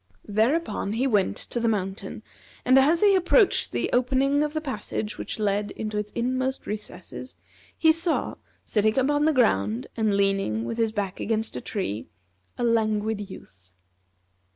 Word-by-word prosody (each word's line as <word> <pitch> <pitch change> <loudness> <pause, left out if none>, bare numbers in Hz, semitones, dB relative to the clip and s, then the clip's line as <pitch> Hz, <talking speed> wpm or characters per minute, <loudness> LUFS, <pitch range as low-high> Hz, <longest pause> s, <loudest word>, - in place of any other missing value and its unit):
Thereupon 220 +1 0
he 240 +4 0
went 210 -7 +2
to 240 - -3
the 235 - +1
mountain, 195 -1 -3 0.4
and 255 +1 +6
as 310 +5 +4
he 410 -1 +6
approached 380 +3 +3
the - - -1
opening 270 +3 +2
of 300 0 -1
the 310 - 0
passage 260 -7 -4
which - - -4
led 205 -1 0
into 215 -1 -5
its 210 0 -5
inmost 260 +2 -1
recesses 210 +3 -7 0.4
he 320 - +5
saw, 330 +1 0 0.3
sitting 215 +1 +1
upon 290 +3 +2
the 315 - +4
ground, 115 - +2
and 215 -3 +1
leaning 195 - +1
his 225 -1 0
back 200 -3 -3
against 220 0 -2
a - - -4
tree, 185 - -3 0.5
a - - -2
Languid 215 -2 0
Youth. 90 - -14
220 Hz, 155 wpm, -25 LUFS, 200-265 Hz, 0.5 s, and